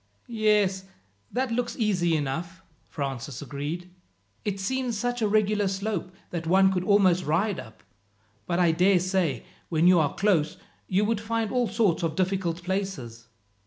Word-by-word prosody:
"Yes, 210 -4 +1 0.5
that 255 0 -1
looks 240 +1 -2
easy 180 -8 +1
enough," 165 +5 -4 0.3
Francis 135 -3 -4
agreed. 150 +5 -5 0.5
"It 200 -2 -2
seems 250 +3 -1
such 245 +2 -2
a 215 - +3
regular 210 -1 +2
slope, 195 -1 -2 0.2
that 165 -2 -4
one 190 +2 +5
could 180 -1 -1
almost 185 -3 +4
ride 185 +6 0
up; 110 0 -12 0.6
but 170 - 0
I 175 -2 +4
dare 180 +3 +4
say, 180 -8 0 0.2
when 165 0 +2
you 180 -1 +7
are 150 -3 0
close 185 -7 +1 0.3
you 200 +3 +2
would 220 -1 0
find 225 -1 -1
all 250 -2 +1
sorts 210 -4 +1
of 165 -2 -1
difficult 185 -2 -1
places." 175 - -4
190 Hz, 155 wpm, -26 LUFS, 165-210 Hz, 0.6 s, you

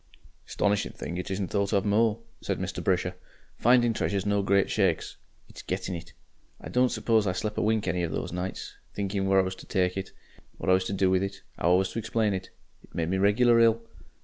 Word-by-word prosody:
"'Stonishing 100 0 0
thing 85 - -5
it 90 - -4
isn't 95 -1 -2
thought 100 -1 0
of 100 -2 +2
more," 110 +2 +2 0.2
said - - -2
Mr. - - -4
Brisher. - - +1 0.5
"Finding 120 -1 +4
treasure's 100 -2 -1
no 100 0 +2
great 100 0 +3
shakes. 95 -6 0 0.3
It's - - -11
gettin' 95 0 -3
it. 85 0 -8 0.5
I - - -9
don't 125 0 +3
suppose 110 -4 +1
I 90 - +1
slep' 105 +3 -3
a - - +1
wink 110 -2 +1
any 90 -1 0
of 85 -2 -2
those - - -3
nights, 90 +1 -4 0.2
thinking 100 -1 -1
where 95 0 +4
I - - +4
was 95 0 -3
to - - -12
take 90 -1 +1
it, 95 0 -4 0.5
what - - 0
I - - +7
was 95 0 +2
to 100 - -3
do 95 -1 +2
with 95 0 +3
it, 100 0 -4 0.2
'ow 85 +2 +3
I - - +6
was 95 0 0
to 115 - -3
explain 110 -1 0
it. 95 -1 -4 0.3
It - - -19
made 80 0 -1
me 95 +1 0
regular 115 +4 +4
ill. 115 0 +5
100 Hz, 230 wpm, -27 LUFS, 95-105 Hz, 0.5 s, I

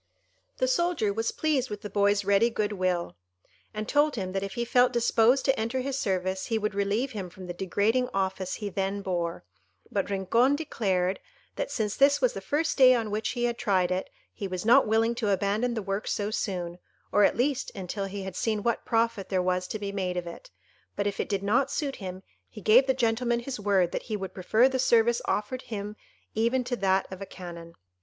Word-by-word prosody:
The - - +1
soldier 345 - +1
was 225 +2 -1
pleased 285 -5 0
with 210 +1 -6
the - - -3
boy's 200 0 +2
ready 200 +4 +4
good 215 -2 -1
will, 185 - -1 0.5
and 215 0 -5
told 295 0 +3
him 190 -4 -3
that 195 0 -2
if 195 0 -5
he 235 - -1
felt 245 +1 +4
disposed 240 +2 +3
to 270 -1 +2
enter 230 +4 -1
his 270 +1 -3
service 190 -1 -1
he 225 - 0
would 210 -1 -1
relieve 200 +6 0
him 195 -6 -5
from 185 +1 -11
the 175 - -5
degrading 205 +7 0
office 190 -1 -2
he 210 -2 -4
then 195 +1 -2
bore; 175 -3 -2 0.5
but 200 -1 -1
Rincon 230 +8 +2
declared, 195 - -1 0.4
that - - -3
since 210 -3 -2
this 280 +1 +4
was 255 -3 +2
the 195 - -6
first 295 +10 -1
day 255 -1 +8
on 225 -3 -2
which 215 +1 -1
he 240 -1 -2
had 240 -1 0
tried 185 -5 +1
it, 185 +1 -2 0.2
he 200 - -5
was 185 +1 -4
not 245 +3 +6
willing 225 +2 +2
to 235 -3 -2
abandon 205 +5 +1
the 220 - -3
work 195 +1 -3
so 205 0 -1
soon, 180 -4 -3 0.3
or 205 - +4
at - - +3
least 270 +2 0
until 195 +1 -4
he 195 0 -5
had 190 -1 -6
seen 215 -1 -1
what 235 -1 0
profit 230 -3 0
there 190 - +1
was 180 0 0
to 215 - -4
be 200 -1 -4
made 185 -2 -2
of 175 - -2
it; - - -10 0.5
but 200 - -1
if 200 -1 -2
it - - -2
did 200 -2 -1
not 250 +7 +2
suit 280 -3 -2
him, 185 -1 -7 0.3
he 215 - -11
gave 235 +6 +5
the 265 - +2
gentleman 240 0 +1
his 250 -1 -5
word 195 -4 +2
that - - -2
he 215 - -1
would 190 -2 -6
prefer 215 +7 +3
the 265 -1 -1
service 235 -1 +3
offered 230 +5 -1
him 210 -1 -6 0.4
even 235 +4 +1
to 245 0 -2
that 190 -3 +1
of 190 - -9
a - - -4
Canon. 170 -2 -9
210 Hz, 220 wpm, -27 LUFS, 190-240 Hz, 0.5 s, day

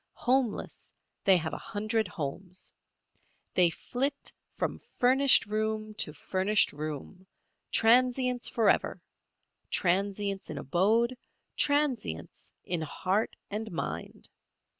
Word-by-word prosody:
Homeless, 250 -3 0 0.4
they 190 -2 +7
have 160 -2 -3
a - - -4
hundred 215 +1 -1
homes. 180 +2 -6 0.8
They 180 -2 +6
flit 270 - -3 0.2
from - - -2 0.2
furnished 265 +2 +5
room 215 0 -2
to - - +1
furnished 190 +7 +1
room, 155 +5 -6 0.4
transients 250 +2 +3
forever—transients 200 -2 -1
in - - -5
abode, 220 - +2 0.4
transients 285 - -1
in 175 -2 -2
heart 185 +7 -1 0.2
and 220 +1 -4
mind. 170 - -5
210 Hz, 95 wpm, -29 LUFS, 185-245 Hz, 0.8 s, they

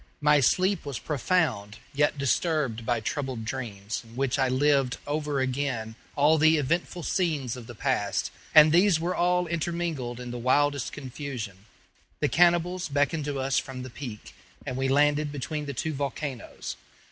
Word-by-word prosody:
My 150 0 +5
sleep 185 +7 +2
was 140 -4 -4
profound, 130 - 0 0.2
yet 145 +1 +2
disturbed 140 -4 0
by 120 -2 +1
troubled 130 -1 -3
dreams, 110 -4 -4
in 115 0 -16
which 135 +1 0
I 130 -1 +3
lived 135 -1 +2
over 145 -1 -1
again 130 -4 -2 0.2
all 150 +2 +4
the 155 +1 +5
eventful 170 +4 -1
scenes 150 -11 0
of 120 -3 -10
the 120 - -9
past; 110 -5 -1 0.2
and 155 0 +9
these 180 0 +5
were 175 +3 -1
all 180 0 +2
intermingled 165 -7 -3
in 125 -1 -6
the 120 - -5
wildest 140 +2 +2
confusion. 125 -8 -7 0.5
The - - +1
cannibals 175 0 +3
beckoned 145 +2 +1
to 145 -1 -2
us 135 0 +1
from 130 -2 -7
the 130 - -8
peak, 120 -5 -8 0.3
and 130 - -3
we 135 +1 0
landed 145 +2 +3
between 145 +2 -4
the 140 - -3
two 160 +5 -2
volcanoes. 140 -2 -5
140 Hz, 160 wpm, -27 LUFS, 125-155 Hz, 0.5 s, and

